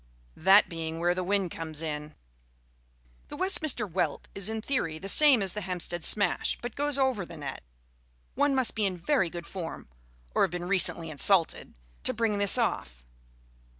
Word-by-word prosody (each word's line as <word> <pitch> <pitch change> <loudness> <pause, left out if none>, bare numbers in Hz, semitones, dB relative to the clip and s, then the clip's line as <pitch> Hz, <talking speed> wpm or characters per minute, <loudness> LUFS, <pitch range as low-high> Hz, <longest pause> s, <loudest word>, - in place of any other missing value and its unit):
That 195 +2 +5
being 165 -1 -5
where 175 +1 +1
the 185 0 -3
wind 195 -1 0
comes 160 -1 -6
in. 150 -1 -5 1.1
The - - -8
Westminster 315 - +3
Welt 180 -1 -2
is 195 +1 -2
in 220 0 -3
theory 165 - -1
the 190 - -8
same 270 0 +5
as 190 - 0
the 210 - -4
Hampstead 175 -2 -3
Smash, 205 -4 +2
but 240 - -6
goes 290 -1 0
over 260 -7 +1
the 170 -1 -10
net. 140 -3 -6 0.7
One 285 0 +1
must 260 -2 +1
be 215 -2 0
in 185 -2 -4
very 190 - +1
good 170 0 -7
form 170 - -7 0.4
(or - - +1
have - - +4
been 175 +1 -5
recently 175 -3 0
insulted) 165 +4 +2 0.3
to - - 0
bring 220 -3 0
this 200 -1 +3
off. - - -2
190 Hz, 175 wpm, -28 LUFS, 165-220 Hz, 1.1 s, That